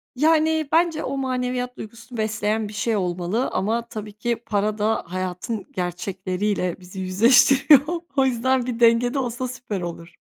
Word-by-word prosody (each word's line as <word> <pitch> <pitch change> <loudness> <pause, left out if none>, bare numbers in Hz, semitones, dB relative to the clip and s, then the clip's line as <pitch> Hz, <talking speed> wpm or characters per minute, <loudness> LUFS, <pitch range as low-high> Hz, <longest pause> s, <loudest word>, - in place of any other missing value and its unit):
Yani, 315 +1 +2
bence 330 -1 +2
o 275 - -3
maneviyat 250 -1 -2
duygusunu 230 +2 -10
besleyen 215 0 -1
bir 210 - -10
şey 220 +2 0
olmalı 180 +5 -1
ama 230 +3 -1
tabii 215 -2 -7
ki 235 +3 -1
para 210 0 0
da 215 +1 0
hayatın 185 +4 -4
gerçekleriyle 185 +1 -2
bizi 185 +1 -10
yüzleştiriyor. 245 - +5 0.3
O 270 - +4
yüzden 260 0 +1
bir 240 -2 -4
dengede 240 +3 +4
olsa 250 0 -3
süper 240 -6 -5
olur. 170 0 -7
225 Hz, 145 wpm, -23 LUFS, 195-255 Hz, 0.3 s, yüzleştiriyor